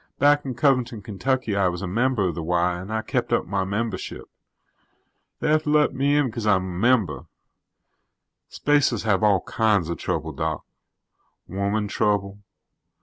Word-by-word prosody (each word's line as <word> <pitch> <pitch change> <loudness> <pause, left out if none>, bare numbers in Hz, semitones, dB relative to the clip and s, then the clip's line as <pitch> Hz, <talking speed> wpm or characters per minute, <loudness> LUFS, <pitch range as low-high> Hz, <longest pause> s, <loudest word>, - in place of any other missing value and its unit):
"Back 145 +1 +3
in 130 -2 -4
Covington, 125 -5 +1
Kentucky, 115 +2 -1
I 100 -2 +2
was 90 +1 -3
a - - -2
member 115 +1 +1
of 85 - -2
the 85 - -5
Y 85 +1 +1
and 95 +4 -8
I 110 0 -1
kept - - -2
up - - +1
my 95 +1 -1
membership. 100 +1 -4 1.1
They - - -1
have 155 0 +3
to 150 - -4
let 150 0 +3
me 140 +2 +1
in 145 - +3
because 115 -3 -4
I'm 95 -3 +3
a 90 -1 -5
member. 105 - +1 1.2
Spacers 145 -6 +1
have 100 -4 +1
all 100 -4 +3
kinds 105 -7 +1
of 85 - -4
trouble, 80 0 -2
Doc. 80 +1 -3 0.8
Woman 100 +3 -1
trouble. 100 -1 -1
105 Hz, 165 wpm, -24 LUFS, 95-125 Hz, 1.2 s, Back